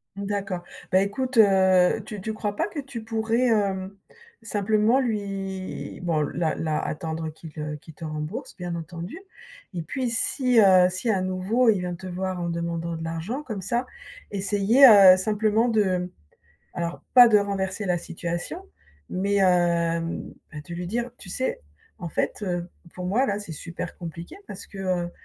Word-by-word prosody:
D'accord. 200 Hz, -3 st, -3 dB, 0.3 s
Bah 185 Hz, -, +5 dB
écoute, 250 Hz, +6 st, -2 dB
heu, 190 Hz, -2 st, +5 dB
tu 210 Hz, -1 st, -7 dB
tu 220 Hz, +2 st, -3 dB
crois 210 Hz, -1 st, -3 dB
pas -, -, 0 dB
que 310 Hz, -, -6 dB
tu 265 Hz, -5 st, -7 dB
pourrais, 225 Hz, +2 st, +1 dB
heu, 195 Hz, -2 st, 0 dB, 0.5 s
simplement 215 Hz, +3 st, +2 dB
lui 195 Hz, -5 st, -4 dB
bon 165 Hz, -3 st, 0 dB
là 160 Hz, +2 st, -1 dB
là 155 Hz, -1 st, -1 dB
attendre 160 Hz, +1 st, -3 dB
qu'il, 160 Hz, +1 st, -11 dB
heu 150 Hz, 0 st, -4 dB
qu'il 160 Hz, -, -14 dB
te 165 Hz, -, -12 dB
rembourse, 155 Hz, +4 st, -5 dB
bien 175 Hz, -2 st, -4 dB
entendu, 170 Hz, -, -6 dB, 0.6 s
et 170 Hz, -, -3 dB
puis 255 Hz, +8 st, -2 dB
si, 245 Hz, +1 st, +2 dB
heu, 185 Hz, -3 st, +7 dB
si 185 Hz, +5 st, -1 dB
à 195 Hz, -3 st, +1 dB
nouveau, 185 Hz, +7 st, +1 dB
il 205 Hz, -4 st, +3 dB
vient 180 Hz, 0 st, -3 dB
te 185 Hz, +2 st, -9 dB
voir 185 Hz, 0 st, -3 dB
en 170 Hz, -, -2 dB
demandant 170 Hz, 0 st, -3 dB
de 160 Hz, -, -6 dB
l'argent, 165 Hz, -, -4 dB
comme 215 Hz, -8 st, -5 dB
ça. 235 Hz, +7 st, -1 dB, 0.5 s
Essayer, 205 Hz, +7 st, +5 dB
heu, 195 Hz, -5 st, +9 dB
simplement 215 Hz, +3 st, +1 dB
de 185 Hz, -5 st, +1 dB, 0.6 s
alors 170 Hz, 0 st, -4 dB
pas 245 Hz, -2 st, +9 dB
de 215 Hz, -, +5 dB
renverser 200 Hz, 0 st, -1 dB
la 180 Hz, -2 st, +1 dB
situation, 175 Hz, -, -5 dB, 0.5 s
mais 200 Hz, +2 st, +1 dB
heu, -, -, +6 dB
ben 170 Hz, -2 st, +1 dB, 0.3 s
de 170 Hz, -, -6 dB
lui 175 Hz, +1 st, -4 dB
dire: 240 Hz, +6 st, -2 dB
«Tu 190 Hz, -, -12 dB
sais? 260 Hz, +8 st, -2 dB, 0.4 s
en 175 Hz, -, -5 dB
fait, 190 Hz, -, -2 dB
heu, 175 Hz, -3 st, -2 dB, 0.3 s
pour 180 Hz, -, -6 dB
moi 220 Hz, +9 st, +2 dB
là, 205 Hz, -3 st, -1 dB
c'est 205 Hz, -6 st, -7 dB
super 165 Hz, +3 st, -6 dB
compliqué, 170 Hz, -, -8 dB
parce 195 Hz, -, -8 dB
que, 200 Hz, -, -12 dB
heu 180 Hz, -2 st, -1 dB
190 Hz, 170 wpm, -25 LUFS, 175-215 Hz, 0.6 s, heu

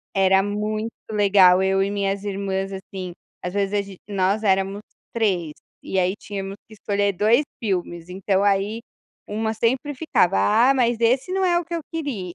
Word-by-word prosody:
Era 190 Hz, 0 st, +4 dB
muito 215 Hz, +2 st, -2 dB, 0.2 s
legal. 195 Hz, -3 st, +5 dB
Eu 195 Hz, 0 st, +2 dB
e 200 Hz, -, 0 dB
minhas 200 Hz, 0 st, -2 dB
irmãs, 195 Hz, -1 st, -3 dB
assim, 190 Hz, -1 st, -7 dB, 0.3 s
às 180 Hz, +2 st, -4 dB
vezes 200 Hz, 0 st, 0 dB
a 200 Hz, -, +1 dB
ge 195 Hz, -1 st, -11 dB
nós 200 Hz, +1 st, 0 dB
éramos 195 Hz, 0 st, +1 dB, 0.3 s
3, 190 Hz, -9 st, 0 dB, 0.3 s
e 190 Hz, -, -2 dB
aí 185 Hz, +1 st, +2 dB
tínhamos 195 Hz, -1 st, -6 dB
que 220 Hz, -, -13 dB
escolher 205 Hz, -1 st, 0 dB
2 215 Hz, -, +3 dB, 0.2 s
filmes, 175 Hz, -5 st, -3 dB
então 190 Hz, +1 st, 0 dB
aí 205 Hz, +2 st, +1 dB, 0.5 s
1 220 Hz, +1 st, -2 dB
sempre 260 Hz, +6 st, 0 dB
ficava: 225 Hz, -, +2 dB, 0.3 s
"Ah, -, -, +4 dB
mas 240 Hz, -3 st, +2 dB
esse 255 Hz, +10 st, +2 dB
não 380 Hz, 0 st, +1 dB
é 345 Hz, -1 st, +3 dB
o -, -, -7 dB
que 340 Hz, +1 st, -6 dB
eu 335 Hz, -, -1 dB
queria". 250 Hz, -, -4 dB
200 Hz, 175 wpm, -23 LUFS, 190-220 Hz, 0.5 s, legal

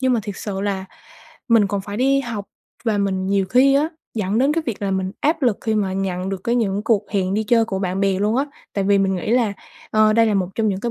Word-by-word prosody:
Nhưng 260 Hz, -1 st, +2 dB
mà 230 Hz, -, +2 dB
thiệt 200 Hz, -1 st, -6 dB
sự 195 Hz, -2 st, -4 dB
là 195 Hz, -2 st, -2 dB, 0.6 s
mình 225 Hz, -3 st, +5 dB
còn 200 Hz, 0 st, -2 dB
phải 205 Hz, +1 st, -7 dB
đi 275 Hz, +2 st, +3 dB
học 230 Hz, -6 st, -5 dB, 0.4 s
và 215 Hz, -3 st, +1 dB
mình 190 Hz, -1 st, 0 dB
nhiều 195 Hz, 0 st, +2 dB
khi 260 Hz, +6 st, +4 dB
á, 300 Hz, +3 st, +3 dB, 0.3 s
dẫn 210 Hz, 0 st, 0 dB
đến 275 Hz, +3 st, +3 dB
cái 330 Hz, 0 st, 0 dB
việc 220 Hz, -4 st, -4 dB
là 195 Hz, -, 0 dB
mình 190 Hz, 0 st, -1 dB
áp 310 Hz, +1 st, +1 dB
lực 240 Hz, -6 st, +2 dB
khi 220 Hz, -1 st, -1 dB
mà 200 Hz, -3 st, 0 dB
nhận 190 Hz, -1 st, -2 dB
được 195 Hz, -1 st, -5 dB
cái 235 Hz, -, +1 dB
những 210 Hz, -4 st, 0 dB
cuộc 220 Hz, -3 st, +1 dB
hẹn 195 Hz, -1 st, 0 dB
đi 215 Hz, -, +1 dB
chơi 230 Hz, +1 st, +3 dB
của 195 Hz, -3 st, -3 dB
bạn 190 Hz, 0 st, -2 dB
bè 195 Hz, -1 st, +1 dB
luôn 210 Hz, +3 st, +1 dB
á. 275 Hz, -, +2 dB, 0.3 s
Tại 200 Hz, -1 st, -1 dB
vì 200 Hz, 0 st, +4 dB
mình 195 Hz, -1 st, +1 dB
nghĩ 180 Hz, -, -3 dB
là, 235 Hz, -4 st, +2 dB, 0.4 s
ờ, 215 Hz, 0 st, +4 dB
đây 230 Hz, 0 st, +4 dB
là 210 Hz, -, +1 dB
một 185 Hz, -2 st, 0 dB
trong 220 Hz, -1 st, +1 dB
những 190 Hz, -1 st, -2 dB
cái 235 Hz, +2 st, -2 dB
205 Hz, 275 wpm, -21 LUFS, 195-230 Hz, 0.6 s, mình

